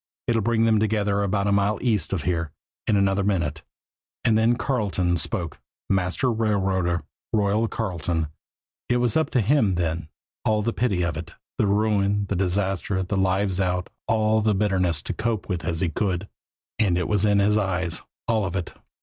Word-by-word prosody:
"It'll 115 -1 +2
bring 115 +1 +2
them 110 -1 +4
together 105 -2 +1
about 100 0 0
a 100 - +2
mile 100 +1 +2
east 105 -10 0
of 95 -6 -1
there 85 -2 -1 0.4
in 105 - +3
another 100 0 +2
minute." 85 -7 0 0.6
And 115 - +4
then 115 +2 +4
Carleton 100 -9 0
spoke 80 -1 -3 0.3
master 95 +7 +1
railroader, 95 -6 0 0.3
"Royal" 105 +1 +2
Carleton, 85 -5 -2 0.6
it 120 - +3
was 120 -3 +1
up 160 - +2
to 125 - +2
him 110 -4 +3
then, 85 -2 -1 0.4
all 105 -1 +2
the 115 +2 0
pity 100 -7 +1
of 85 -3 -1
it, - - -7 0.3
the 105 - +3
ruin, 100 -1 +2
the - - 0
disaster, 95 +1 0
the 95 +3 -3
lives 95 0 +1
out, 90 -1 -1 0.2
all 110 0 +2
the 105 -1 +2
bitterness 90 -7 +1
to - - -3
cope 110 -3 -2
with 90 -4 -2
as 85 0 -2
he 90 - +1
could. 95 +2 -1 0.5
And 95 -6 +3
it 90 - 0
was 105 -2 +2
in 105 -1 +4
his 100 +1 +3
eyes, 90 -5 0 0.3
all 110 -3 +2
of 95 -1 -4
it. 90 -3 -3
100 Hz, 180 wpm, -24 LUFS, 90-110 Hz, 0.6 s, them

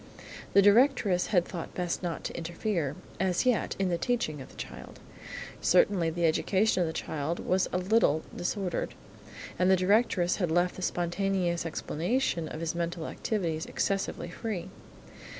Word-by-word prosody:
The 200 - +7
directress 205 -4 +4
had 180 -4 +3
thought 170 -3 -7
best 180 -1 -2
not 175 -3 -3
to - - -5
interfere, 170 -3 -2 0.2
as 185 +4 +1
yet, 250 -3 +1
in 195 -1 +1
the 170 -1 0
teaching 170 - -1
of 130 - -10
the - - -16
child. - - -9 0.6
Certainly, 180 -2 +4
the 170 +1 0
education 190 +5 +2
of 170 - +2
the - - -2
child 160 0 -3
was 185 +1 +1
a - - 0
little 180 -5 +2
disordered, 180 0 -2 0.6
and 185 +1 +4
the 190 - +7
directress 185 -1 +2
had 180 -4 0
left 175 +2 +2
the - - -8
spontaneous 175 -1 0
explanation 170 - -1
of 155 - -6
his 165 -1 -1
mental 170 -1 -3
activities 170 -7 -2
excessively 195 -3 -2
free. 190 -3 -4
180 Hz, 155 wpm, -29 LUFS, 170-195 Hz, 0.6 s, The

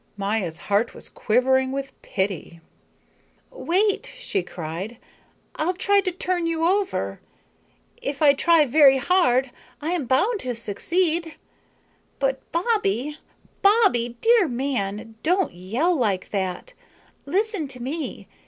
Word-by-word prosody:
Maya's 200 -5 -1
heart 205 +6 0
was - - -9
quivering 260 +3 +2
with 270 0 -4
pity. 190 -3 -3 0.9
"Wait," 410 -3 0
she 395 - -2
cried, 180 - -6 0.6
"I'll 345 +4 0
try 400 +2 +3
to 370 - -2
turn 355 -1 -1
you 330 0 0
over. 385 +2 0 0.8
If 280 0 -4
I 290 -2 +6
try 325 +2 +4
very 275 0 +6
hard 265 -5 +2 0.3
I 310 +3 -3
am 335 -8 -1
bound 395 - +2
to 250 -6 -3
succeed. 325 - -1 0.8
But 270 -1 0
Bobbie, 300 - 0 0.4
Bobbie, 390 - +3
dear 460 -5 +5
man, 225 -4 -3
don't 360 - +1
yell 230 - 0
like 205 - -1
that. 195 - -3 0.5
Listen 395 -1 0
to 255 -2 -7
me. 285 +6 -5
275 Hz, 120 wpm, -23 LUFS, 230-360 Hz, 0.9 s, I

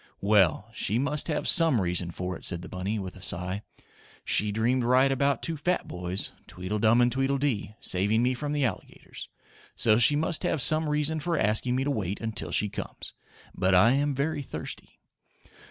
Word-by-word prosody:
"Well, 100 -1 +3
she 110 -1 -1
must 145 +3 -1
have 150 -3 -2
some 165 -8 +4
reason 90 -2 0
for 90 +1 -5
it," - - -12
said 85 -1 0
the - - -8
bunny, 95 +4 -3
with 95 -3 -6
a 95 - -13
sigh. 90 +4 -4 0.6
"She 105 0 +1
dreamed 120 +4 +1
right 130 +3 +3
about 140 -1 0
two 165 - -2
fat 175 +5 -1
boys 90 +2 -4 0.2
Tweedledum 105 +6 +1
and 120 0 +3
Tweedledee 135 -5 -1
saving 105 +5 +1
me 125 +1 +2
from 145 +3 -4
the 145 -2 +1
alligators, 105 -7 -7 0.5
so 110 -1 +4
she 120 +5 +5
must 160 +2 0
have 160 - 0
some 155 +4 +4
reason 150 +1 0
for 165 +2 -1
asking 110 +3 +1
me 130 - 0
to 145 - -1
wait 100 -6 -3
until 110 -2 -4
she 105 - +2
comes. 100 - -7 0.4
But 95 0 +1
I 110 +6 +6
am 145 +2 +1
very 145 +2 -2
thirsty." 135 - -8
120 Hz, 185 wpm, -27 LUFS, 100-140 Hz, 0.6 s, I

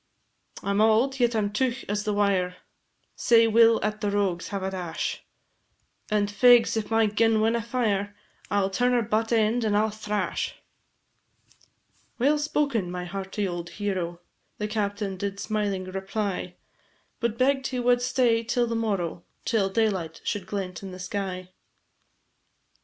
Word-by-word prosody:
"I 200 - -1
'm 200 +1 +2
auld, 230 +5 +3
yet 240 -1 +2
I - - +2
'm 205 -1 0
teugh 260 +3 -1
as 205 +1 -2
the 210 - 0
wire, 195 -3 +1 0.6
Sae 230 -1 +5
we 225 +1 +6
'll 230 0 +5
at 215 0 -2
the 205 - 0
rogues 195 -4 0
have 200 -1 -4
a 190 - -2
dash, 180 -3 -3 0.9
And, 210 -1 +2
fegs, 235 +4 +5
if 220 -2 -2
my 225 0 +3
gun 220 +1 +2
winna 225 +2 +2
fire, 210 -4 -1 0.3
I 205 - +2
'll 195 0 0
turn 245 +5 +2
her 240 -1 +3
butt 220 +1 0
end, 225 +1 +2
and 210 -2 +2
I 210 - +4
'll 220 - -1
thrash." 210 -1 -2 1.6
"Well 290 +5 +3
spoken, 285 -10 0
my 180 0 -4
hearty 195 +2 -3
old 175 -1 -5
hero," 185 -4 -3 0.4
The 210 - -2
captain 205 -2 -2
did 200 +1 -4
smiling 205 -3 -1
reply, 190 -1 -3 0.6
But 235 -1 -1
begg'd 270 +1 +2
he 255 - -3
wad 245 0 +3
stay 245 -2 +2
till 240 +1 +1
to 230 - -2
morrow, 195 -7 -2 0.2
Till 210 -4 +1
daylight 190 -6 -1
should 200 -3 -3
glent 190 -3 -4
in 195 - -7
the 185 0 -9
sky. 185 -1 -4
210 Hz, 165 wpm, -26 LUFS, 195-230 Hz, 1.6 s, we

